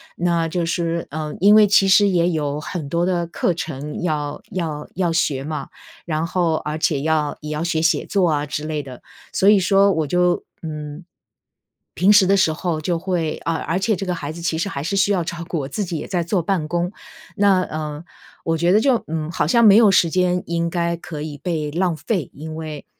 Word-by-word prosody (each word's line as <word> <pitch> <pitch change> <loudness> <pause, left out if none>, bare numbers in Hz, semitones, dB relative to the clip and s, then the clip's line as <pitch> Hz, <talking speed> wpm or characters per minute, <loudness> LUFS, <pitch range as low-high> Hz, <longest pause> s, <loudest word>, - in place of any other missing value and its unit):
那 170 -1 0
就 170 +1 -2
是， 170 0 -2
呃， 155 0 -4
因 205 +3 +6
为 215 -1 +7
其 200 -1 +4
实 200 +1 +6
也 175 -2 +2
有 150 -3 -2
很 150 -1 -5
多 170 +2 +1
的 175 -2 0
课 170 +1 0
程 150 -3 -5
要 150 -4 -2
要 160 -6 -4
要 175 -2 0
学 145 -5 0
嘛， 150 -1 -4 0.4
然 160 -1 -1
后 170 -2 0
而 150 0 -3
且 150 -3 +1
要 155 -1 0
也 150 0 -6
要 155 +1 -2
学 165 -2 0
写 165 -2 +2
作 195 -3 +2
啊 150 -1 0
之 150 +1 -4
类 155 -1 -2
的。 130 -3 -11 0.3
所 190 - +1
以 205 -1 +6
说 195 +2 +4
我 160 -4 0
就， 180 +3 +1 0.2
嗯， 150 +1 -6 0.9
平 190 +4 +4
时 205 -2 +6
的 195 +2 +3
时 165 -4 +3
候， 165 0 -2
就 170 +2 -1
会 170 -3 -2
呃， 165 - +1
而 165 +2 -2
且 215 +3 +1
这 195 - -4
个 180 -1 -1
孩 150 -3 -5
子 170 +2 -9
其 165 -1 -1
实 195 +5 -1
还 140 - -4
是 170 +5 -2
需 200 +1 +3
要 185 -4 +1
照 170 0 -5
顾， 170 - -2
我 135 - -4
自 205 +9 -3
己 170 -2 -4
也 - - -6
在 180 -2 -1
做 180 +2 0
办 170 -2 -1
公。 175 +2 -1 0.4
那， 200 -3 +4
呃， 155 -1 -5 0.4
我 165 0 +1
觉 170 +2 +2
得 205 - +5
就， 245 0 +2
嗯， 155 -1 -3
好 155 - 0
像 235 +9 +4
没 200 -2 +8
有 220 -2 +6
时 175 -3 +4
间 180 +1 +1
应 170 0 -1
该 170 0 -1
可 160 -2 -8
以 150 -1 -6
被 155 0 -3
浪 175 +1 0
费， 185 -2 -2
因 155 +2 -8
为 155 -2 -7
170 Hz, 240 characters per minute, -21 LUFS, 155-180 Hz, 0.9 s, 没